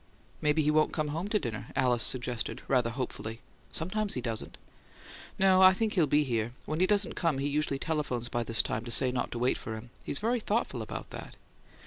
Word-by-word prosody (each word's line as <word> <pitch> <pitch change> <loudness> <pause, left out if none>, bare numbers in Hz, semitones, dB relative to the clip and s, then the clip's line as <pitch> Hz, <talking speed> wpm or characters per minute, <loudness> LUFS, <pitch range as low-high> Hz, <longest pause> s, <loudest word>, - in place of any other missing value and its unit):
"Maybe 150 +1 +2
he 150 - +2
won't 155 0 +2
come 155 -2 -1
home 165 +6 -3
to 210 - +1
dinner," 115 - -4
Alice 125 -2 +3
suggested, 120 -1 +1
rather 125 -3 +2
hopefully. 115 -2 -5 0.3
"Sometimes 200 +5 -1
he - - -1
doesn't." 115 -2 -4 0.8
"No; 190 -1 +5
I 185 0 +8
think 220 +2 -1
he'll 170 -7 +3
be 150 +2 +3
here. 120 -3 -2
When 155 +1 -3
he 185 - +4
doesn't 205 -1 +2
come 165 -5 0
he 140 +1 -1
usually 145 -1 0
telephones 140 -6 -2
by 120 -1 -2
this 115 0 +2
time 110 - -3
to - - -6
say 125 +2 +5
not 125 -1 -2
to - - -4
wait 125 +2 +1
for 110 - -6
him; 115 +2 -10
he's - - +1
very 235 +6 +1
thoughtful 220 +1 -1
about - - -7
that. - - -9
145 Hz, 210 wpm, -29 LUFS, 120-175 Hz, 0.8 s, I